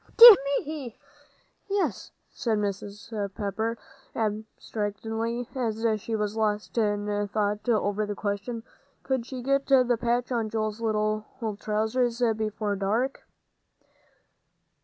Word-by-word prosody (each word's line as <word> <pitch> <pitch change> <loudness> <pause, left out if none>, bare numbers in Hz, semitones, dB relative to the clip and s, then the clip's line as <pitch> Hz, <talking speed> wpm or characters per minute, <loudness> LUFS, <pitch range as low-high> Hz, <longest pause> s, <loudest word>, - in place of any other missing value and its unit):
"Dear 465 -2 +13 0.3
me, 285 -6 -6 0.7
yes," 400 0 -1 0.2
said 225 -3 0
Mrs. 205 +1 -4 0.2
Pepper, 220 +2 -2 0.4
abstractedly, 220 +2 -3
as 230 -3 -2 0.2
she 225 - -3
was 210 0 -1
lost 210 -1 -1
in 205 -1 0
thought 210 +2 -1
over 210 -2 +1
the 205 - -3
question, 210 +3 -3 0.4
Could 260 -3 -1
she 255 -2 -6
get 275 +1 +1
the 255 -3 +4
patch 240 +1 0
on 230 -3 0
Joel's 215 0 -2
little 215 -1 0 0.3
trousers 230 +3 0 0.2
before 215 -1 -2
dark? 220 +7 -1
220 Hz, 110 wpm, -27 LUFS, 210-240 Hz, 0.7 s, Dear